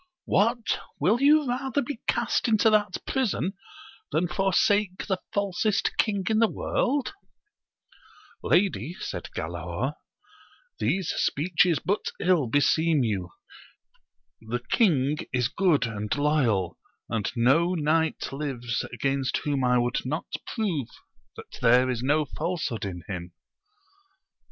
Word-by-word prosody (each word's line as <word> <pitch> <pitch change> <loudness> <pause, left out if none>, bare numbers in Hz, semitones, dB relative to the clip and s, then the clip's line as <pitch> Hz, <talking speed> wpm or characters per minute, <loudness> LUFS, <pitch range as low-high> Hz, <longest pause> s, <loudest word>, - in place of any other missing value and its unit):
— - - -66
What! 230 +3 +1 0.2
will 205 - +2
you 295 0 +5
rather 265 +3 -1
be 260 -1 -6
cast - - +1
into 220 0 +4
that 210 -3 +2
prison 220 - -1 0.6
than 175 - +1
forsake 195 +1 +1
the 190 -3 -2
falsest 200 +1 0
king 200 -4 +1
in 220 -1 +2
the 225 -1 +4
world 280 +6 -1 1.3
1 - - -6
Lady, 175 - +2
said - - -5
Galaor, 85 - -3 0.9
these 190 -3 0
speeches 165 +2 +2
but 200 +8 -1
ill 175 -7 +2
beseem 145 +3 +3
you: 100 -6 -2 1.1
the 115 +2 -4
king 150 - +3
is 125 -2 +1
good 175 -7 +2
and 105 -2 -5
loyal, 125 - +1 0.3
and 110 -3 -2
no 155 +10 +3
knight 160 0 0
lives 130 -4 -3
against 135 -1 -1
whom 140 -3 0
I 125 0 +3
would 120 0 0
not 150 +5 -4 0.2
prove 175 - -1 0.5
that - - -11
there 125 +2 +5
is 120 -2 -3
no 145 +4 +2
falsehood 155 - -3
in 90 -3 -6
him. 90 -3 -6
155 Hz, 125 wpm, -26 LUFS, 125-200 Hz, 1.3 s, you